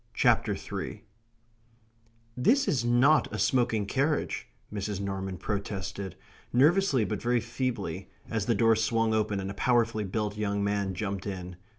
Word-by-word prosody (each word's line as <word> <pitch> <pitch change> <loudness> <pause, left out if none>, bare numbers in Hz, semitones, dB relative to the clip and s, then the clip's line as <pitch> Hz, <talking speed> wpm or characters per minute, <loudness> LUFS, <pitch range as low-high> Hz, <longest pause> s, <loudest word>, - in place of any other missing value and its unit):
CHAPTER - - +3
THREE - - -6 1.3
"This 260 - +3
is 125 -6 +1
not 125 +6 +4
a - - -3
smoking 120 -5 +2
carriage," 140 +8 0 0.3
Mrs. 100 -1 -3
Norman 95 -1 -3
protested, 100 -1 -4 0.4
nervously 145 - +4
but 105 -2 -3
very 120 0 +2
feebly, 115 -6 -3 0.2
as 110 -2 -2
the 115 - +3
door 115 +2 +4
swung 115 0 +1
open 105 -2 0
and 95 0 -4
a - - -6
powerfully 115 0 +2
built 105 +1 -2
young 100 -1 -1
man 100 -2 -1
jumped 100 +1 -3
in. 90 -2 -5
110 Hz, 145 wpm, -29 LUFS, 100-120 Hz, 1.3 s, not